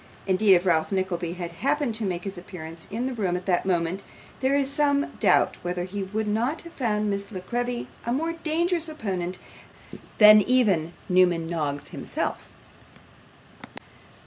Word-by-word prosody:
Indeed, 195 Hz, +1 st, +5 dB
if 175 Hz, +1 st, +1 dB
Ralph 165 Hz, -2 st, +2 dB
Nickleby 180 Hz, -3 st, -1 dB
had 175 Hz, -1 st, -5 dB
happened 285 Hz, -2 st, +1 dB
to 220 Hz, 0 st, +1 dB
make 175 Hz, -2 st, -3 dB
his 195 Hz, 0 st, -5 dB
appearance 170 Hz, -2 st, -8 dB
in 230 Hz, +4 st, -3 dB
the 260 Hz, -, -2 dB
room 195 Hz, -7 st, -1 dB
at 180 Hz, 0 st, -4 dB
that 185 Hz, 0 st, +1 dB
moment, 175 Hz, +1 st, 0 dB, 0.4 s
there 265 Hz, +1 st, +2 dB
is 280 Hz, -1 st, +2 dB
some 285 Hz, 0 st, +1 dB
doubt -, -, +3 dB
whether 175 Hz, 0 st, -3 dB
he 195 Hz, +3 st, -5 dB
would 210 Hz, +3 st, -3 dB
not 235 Hz, +9 st, 0 dB
have 335 Hz, -, -12 dB
found 215 Hz, -5 st, 0 dB
Miss 200 Hz, +1 st, -2 dB
La 190 Hz, -, -5 dB
Creevy 240 Hz, +5 st, -3 dB, 0.2 s
a 235 Hz, -, -2 dB
more 325 Hz, +6 st, 0 dB
dangerous 330 Hz, +1 st, -1 dB
opponent 185 Hz, -, -3 dB, 0.8 s
than 210 Hz, 0 st, +9 dB
even 200 Hz, -9 st, +2 dB
Newman 180 Hz, -3 st, +3 dB
Noggs 150 Hz, -4 st, -3 dB
himself. -, -, -3 dB
200 Hz, 160 wpm, -25 LUFS, 180-250 Hz, 0.8 s, than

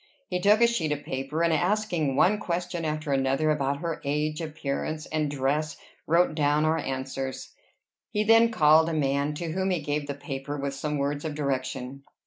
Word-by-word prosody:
He 180 Hz, -, -1 dB
took 210 Hz, +4 st, +5 dB
a -, -, +8 dB
sheet 200 Hz, -10 st, 0 dB
of 145 Hz, -, -6 dB
paper, 135 Hz, +5 st, -2 dB
and 170 Hz, -1 st, +3 dB
asking 175 Hz, -5 st, 0 dB
one 205 Hz, +9 st, +4 dB
question 175 Hz, -3 st, -3 dB
after 155 Hz, -1 st, -2 dB
another 135 Hz, +3 st, +2 dB
about 140 Hz, -2 st, 0 dB
her 165 Hz, -2 st, -3 dB
age, 150 Hz, +2 st, -1 dB
appearance, 155 Hz, 0 st, -3 dB
and 155 Hz, -2 st, -1 dB
dress, 145 Hz, +2 st, -1 dB, 0.3 s
wrote 170 Hz, +1 st, +3 dB
down 150 Hz, 0 st, +2 dB
our 160 Hz, +1 st, +2 dB
answers. 130 Hz, 0 st, -4 dB, 0.6 s
He 210 Hz, -, 0 dB
then 225 Hz, +2 st, +6 dB
called 160 Hz, -5 st, +5 dB
a -, -, -2 dB
man, 140 Hz, 0 st, 0 dB
to 165 Hz, +1 st, -4 dB
whom 190 Hz, +3 st, -1 dB
he 180 Hz, -2 st, +1 dB
gave 145 Hz, -1 st, -2 dB
the 140 Hz, -, -3 dB
paper, 140 Hz, 0 st, -5 dB
with 140 Hz, 0 st, -3 dB
some 150 Hz, +2 st, -3 dB
words 145 Hz, +1 st, -1 dB
of 155 Hz, -2 st, -4 dB
direction. 135 Hz, -2 st, -3 dB
150 Hz, 185 wpm, -27 LUFS, 140-165 Hz, 0.6 s, a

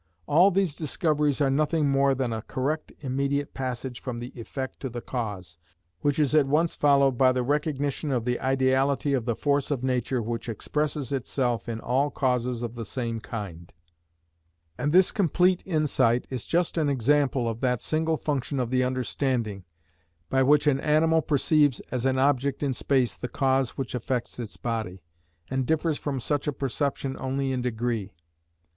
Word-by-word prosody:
All 175 Hz, +6 st, +5 dB
these 190 Hz, -5 st, 0 dB
discoveries 150 Hz, -2 st, 0 dB
are 135 Hz, -1 st, +3 dB
nothing 155 Hz, +2 st, +2 dB
more 135 Hz, 0 st, +3 dB
than 125 Hz, -3 st, -1 dB
a 110 Hz, -, -3 dB
correct 140 Hz, +7 st, -3 dB
immediate 140 Hz, +1 st, -1 dB
passage 130 Hz, -1 st, -4 dB
from 125 Hz, -3 st, -4 dB
the 120 Hz, +1 st, -7 dB
effect 130 Hz, +2 st, -6 dB
to 135 Hz, -, -4 dB
the 120 Hz, 0 st, -5 dB
cause, 100 Hz, -10 st, -5 dB, 0.4 s
which 145 Hz, +7 st, +1 dB
is 150 Hz, -2 st, +2 dB
at 150 Hz, -3 st, +4 dB
once 160 Hz, +4 st, +2 dB
followed 140 Hz, -3 st, +3 dB
by 130 Hz, -1 st, +6 dB
the 125 Hz, -1 st, 0 dB
recognition 145 Hz, +1 st, -1 dB
of 120 Hz, -3 st, 0 dB
the 125 Hz, 0 st, 0 dB
ideality 135 Hz, +2 st, +2 dB
of 125 Hz, -4 st, 0 dB
the 120 Hz, -2 st, 0 dB
force 140 Hz, +1 st, 0 dB
of 135 Hz, -4 st, -2 dB
nature 125 Hz, 0 st, 0 dB
which 115 Hz, +1 st, -4 dB
expresses 145 Hz, +3 st, -2 dB
itself 125 Hz, -3 st, -1 dB
in 115 Hz, -1 st, -3 dB
all 135 Hz, +5 st, +1 dB
causes 125 Hz, -3 st, -1 dB
of 120 Hz, -1 st, -4 dB
the 120 Hz, -1 st, -5 dB
same 115 Hz, +1 st, -3 dB
kind; 95 Hz, -7 st, -7 dB, 1.0 s
and 145 Hz, -, -1 dB
this 185 Hz, +2 st, +5 dB
complete 180 Hz, -1 st, +2 dB
insight 135 Hz, -8 st, +2 dB
is 125 Hz, -3 st, -4 dB
just 170 Hz, 0 st, +1 dB
an 150 Hz, -2 st, +2 dB
example 135 Hz, -1 st, +2 dB
of 115 Hz, 0 st, -3 dB
that 125 Hz, -2 st, +1 dB
single 160 Hz, 0 st, 0 dB
function 140 Hz, -2 st, -2 dB
of 125 Hz, -1 st, -1 dB
the 130 Hz, 0 st, +3 dB
understanding, 125 Hz, -5 st, -1 dB, 0.7 s
by 135 Hz, -, +3 dB
which 145 Hz, +2 st, +4 dB
an 140 Hz, -2 st, +3 dB
animal 160 Hz, +2 st, +3 dB
perceives 145 Hz, -2 st, +2 dB
as 130 Hz, +1 st, 0 dB
an 130 Hz, 0 st, +1 dB
object 140 Hz, +1 st, +1 dB
in 140 Hz, -2 st, +1 dB
space 125 Hz, -3 st, +1 dB
the 125 Hz, -, -6 dB
cause 135 Hz, -2 st, +1 dB
which 135 Hz, -, -4 dB
affects 125 Hz, 0 st, -3 dB
its 115 Hz, -4 st, -6 dB
body, 110 Hz, -6 st, -4 dB, 0.5 s
and 130 Hz, -1 st, -1 dB
differs 160 Hz, -1 st, +1 dB
from 140 Hz, -3 st, -3 dB
such 145 Hz, +4 st, -1 dB
a -, -, +2 dB
perception 135 Hz, 0 st, -2 dB
only 135 Hz, +1 st, -1 dB
in 130 Hz, -1 st, -1 dB
degree. 115 Hz, -4 st, -2 dB
135 Hz, 175 wpm, -26 LUFS, 120-145 Hz, 1.0 s, by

